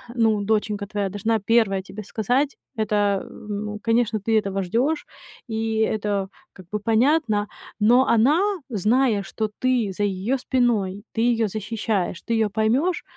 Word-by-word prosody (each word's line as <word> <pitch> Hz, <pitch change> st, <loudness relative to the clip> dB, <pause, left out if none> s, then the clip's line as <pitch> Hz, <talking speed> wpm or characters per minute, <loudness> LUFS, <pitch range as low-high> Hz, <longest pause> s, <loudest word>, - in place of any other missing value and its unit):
ну, 220 Hz, -3 st, +2 dB
доченька 210 Hz, 0 st, 0 dB
твоя 200 Hz, -1 st, -2 dB
должна 220 Hz, +3 st, 0 dB
1 200 Hz, -2 st, +2 dB
тебе 195 Hz, +3 st, -9 dB
сказать. 245 Hz, +8 st, 0 dB, 0.2 s
Это, 215 Hz, -1 st, -1 dB
э 205 Hz, -1 st, +2 dB
в 215 Hz, -, -12 dB
ну, 210 Hz, +1 st, -4 dB
конечно, 230 Hz, -1 st, +1 dB
ты 220 Hz, +2 st, +2 dB
этого 195 Hz, 0 st, -2 dB
ждёшь, 255 Hz, -, 0 dB, 0.5 s
и -, -, -5 dB, 0.4 s
это 200 Hz, -2 st, -1 dB, 0.3 s
как 185 Hz, -, -14 dB
бы 210 Hz, -, -1 dB
понятно. 225 Hz, 0 st, +2 dB, 0.3 s
Но 240 Hz, +5 st, +5 dB
она, 250 Hz, +8 st, +4 dB, 0.3 s
зная, 225 Hz, 0 st, +2 dB
что 215 Hz, +2 st, -3 dB
ты 245 Hz, -6 st, +1 dB
за 205 Hz, -, -2 dB
её 205 Hz, +6 st, 0 dB
спиной, 220 Hz, -7 st, 0 dB
ты -, -, -2 dB, 0.2 s
её 225 Hz, -, +1 dB
защищаешь, 210 Hz, -3 st, -2 dB
ты -, -, +2 dB
её 220 Hz, -1 st, +2 dB
поймёшь, 230 Hz, -, +1 dB
215 Hz, 155 wpm, -23 LUFS, 205-235 Hz, 0.5 s, Но